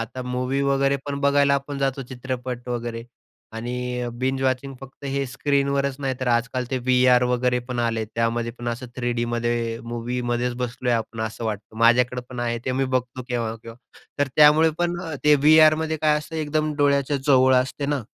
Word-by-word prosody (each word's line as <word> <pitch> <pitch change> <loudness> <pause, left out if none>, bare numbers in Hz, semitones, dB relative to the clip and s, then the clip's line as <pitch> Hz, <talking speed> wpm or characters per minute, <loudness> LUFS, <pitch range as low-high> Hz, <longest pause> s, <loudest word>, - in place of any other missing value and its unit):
आता 115 +3 -5
मूव्ही 125 +2 -2
वगैरे 140 0 +2
पण 140 0 -3
बघायला 140 0 +3
आपण 140 0 -3
जातो 135 0 -1
चित्रपट 125 -1 -5
वगैरे 120 -1 -4 0.5
आणि 125 +1 -3
बिंज 130 +1 -1
वॉचिंग 130 +1 -1
फक्त 135 +1 -13
हे 140 0 -1
स्क्रीनवरच 140 +2 0
नाही 135 -1 -1
तर 130 - -2
आजकाल 125 +2 0
ते 130 - 0
व्ही-आर 125 0 +4
वगैरे 125 0 +1
पण 125 -1 -3
आले 115 -1 0
आहेत. 110 - -3
त्यामध्ये 115 0 0
पण 120 0 -4
असं 120 +2 -4
3Dमध्ये 120 -1 -1
मूव्हीमध्येच 120 +1 -2
बसलोय 125 0 -2
आपण 115 0 -2
असं 110 +1 -4
वाटतं. 105 0 -5
माझ्याकडे 125 +2 +3
पण 125 -1 -6
आहे 120 -1 -1
ते. 130 - -1
मी 135 +1 0
बघतो 130 0 -2
केव्हा-केव्हा. 115 -1 -4 0.4
तर 145 -1 +1
त्यामुळे 155 +2 +6
पण 175 0 0
अ, 165 -3 -5
ते 150 0 +7
व्ही-आरमध्ये 155 +2 +5
काय 150 -1 +4
असतं 155 +2 -8
एकदम 155 0 -1
डोळ्याच्या 140 -1 +2
जवळ 130 -2 +5
असते 130 +3 0
ना, 145 -3 -1
125 Hz, 175 wpm, -23 LUFS, 120-140 Hz, 0.5 s, ते